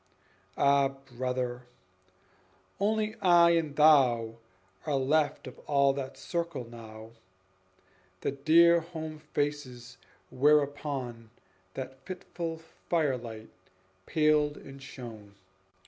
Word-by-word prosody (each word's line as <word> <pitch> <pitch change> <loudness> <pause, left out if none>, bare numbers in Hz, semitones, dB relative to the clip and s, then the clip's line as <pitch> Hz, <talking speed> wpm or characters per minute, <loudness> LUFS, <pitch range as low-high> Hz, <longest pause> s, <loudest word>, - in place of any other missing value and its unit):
Ah, 140 0 +4
brother! 125 -2 -4 1.1
only 215 +1 0
I 175 -2 +6
and 160 -4 0
thou 125 -7 +4 0.5
Are 150 - +1
left 145 +3 +1
of 130 - -10
all 140 -1 +3
that 135 -1 -6
circle 170 -8 -4
now, 110 -1 -11 1.1
The - - -1
dear 165 +5 +5
home 160 -2 -7
faces 145 -5 -4 0.3
whereupon 140 -4 0 0.5
That 130 0 -7
fitful 175 -2 -6 0.3
firelight 125 -9 -1 0.6
paled 150 -1 +2
and 135 0 -12
shone. 115 -7 -10
140 Hz, 90 wpm, -29 LUFS, 125-155 Hz, 1.1 s, I